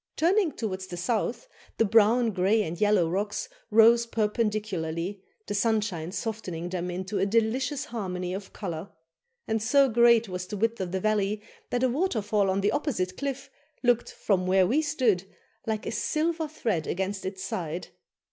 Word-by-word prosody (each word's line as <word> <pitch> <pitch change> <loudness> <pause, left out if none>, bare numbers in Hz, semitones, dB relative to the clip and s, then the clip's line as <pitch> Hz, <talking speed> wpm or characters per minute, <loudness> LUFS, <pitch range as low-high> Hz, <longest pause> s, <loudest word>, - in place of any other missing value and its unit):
Turning 355 +1 +3
towards 190 -7 -4
the 175 - -7
south, 225 - -1 0.3
the 225 - +4
brown, 225 +3 +4
grey, 200 +3 +2
and 170 0 -5
yellow 205 -5 +4
rocks 205 - -2 0.2
rose 230 +1 +6
perpendicularly, 205 -5 -1 0.2
the 205 - -4
sunshine 205 -6 0
softening 185 -6 -4
them 180 0 -3
into 185 +3 -3
a - - +2
delicious 250 +6 +1
harmony 185 -5 -4
of 195 0 -6
colour; 175 -2 -5 0.6
and 220 0 0
so 275 +5 +4
great 235 -1 +5
was 180 -1 -5
the 205 - -5
width 225 +1 0
of 180 -2 -3
the 190 - -1
valley, 210 0 +1 0.3
that 245 +1 0
a - - +5
waterfall 220 - +1
on 190 +1 +1
the 205 - +2
opposite 210 -12 -1
cliff 275 +2 -4 0.3
looked, 240 -1 +2
from 185 -3 0
where 190 0 +4
we 265 +12 +2
stood, 250 - +1 0.4
like 220 -1 -2
a - - -2
silver 320 +6 0
thread 220 - -2
against 190 +1 -2
its 190 0 -5
side. 170 0 -4
210 Hz, 165 wpm, -27 LUFS, 185-235 Hz, 0.6 s, rose